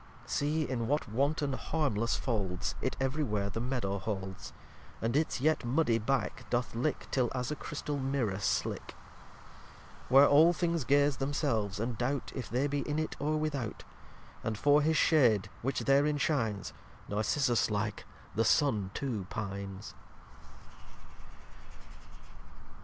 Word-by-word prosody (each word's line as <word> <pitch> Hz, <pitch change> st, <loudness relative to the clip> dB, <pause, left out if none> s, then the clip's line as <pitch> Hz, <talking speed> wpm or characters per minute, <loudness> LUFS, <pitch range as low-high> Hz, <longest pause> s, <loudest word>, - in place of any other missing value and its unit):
lxxx -, -, -18 dB
See 150 Hz, +2 st, +1 dB
in 120 Hz, -3 st, -2 dB
what 145 Hz, 0 st, 0 dB
wanton 140 Hz, +5 st, 0 dB
harmless 130 Hz, -7 st, 0 dB
folds 100 Hz, -7 st, -2 dB
It -, -, -2 dB
ev'ry 135 Hz, +4 st, 0 dB
where 105 Hz, -5 st, -1 dB
the 115 Hz, -, -3 dB
Meadow 120 Hz, -6 st, -2 dB
holds; 95 Hz, -2 st, -5 dB, 0.5 s
And 115 Hz, +3 st, -1 dB
its 155 Hz, -2 st, +1 dB
yet 155 Hz, +2 st, +2 dB
muddy 120 Hz, -2 st, +2 dB
back 120 Hz, +1 st, -2 dB
doth 120 Hz, 0 st, -1 dB
lick, 125 Hz, +6 st, -1 dB
Till 125 Hz, -3 st, +2 dB
as 125 Hz, +2 st, -2 dB
a -, -, -1 dB
Chrystal 150 Hz, -1 st, -4 dB
Mirrour 130 Hz, -8 st, -1 dB
slick; 100 Hz, -, -2 dB, 1.1 s
Where 135 Hz, +3 st, +8 dB
all 155 Hz, +5 st, +6 dB
things 170 Hz, -3 st, -1 dB
gaze 145 Hz, +1 st, +3 dB
themselves, 130 Hz, -8 st, -1 dB
and 115 Hz, +1 st, -3 dB
doubt 135 Hz, +3 st, -1 dB
If 130 Hz, -4 st, -5 dB
they 125 Hz, +4 st, +1 dB
be 145 Hz, 0 st, -1 dB
in 150 Hz, -, 0 dB
it 155 Hz, 0 st, -2 dB
or 155 Hz, +1 st, 0 dB
without. 145 Hz, -7 st, -3 dB, 0.6 s
And 110 Hz, -2 st, -2 dB
for 145 Hz, +7 st, +4 dB
his 155 Hz, +1 st, +2 dB
shade 120 Hz, -, +4 dB
which 135 Hz, +3 st, -1 dB
therein 145 Hz, +2 st, +3 dB
shines, 115 Hz, -, -1 dB, 0.3 s
Narcissus 115 Hz, +4 st, +1 dB
like, 105 Hz, 0 st, -2 dB, 0.3 s
the 115 Hz, -, +2 dB
Sun 110 Hz, -6 st, +2 dB
too 115 Hz, -9 st, -3 dB
pines. 100 Hz, -2 st, -5 dB
130 Hz, 140 wpm, -31 LUFS, 110-145 Hz, 1.1 s, Where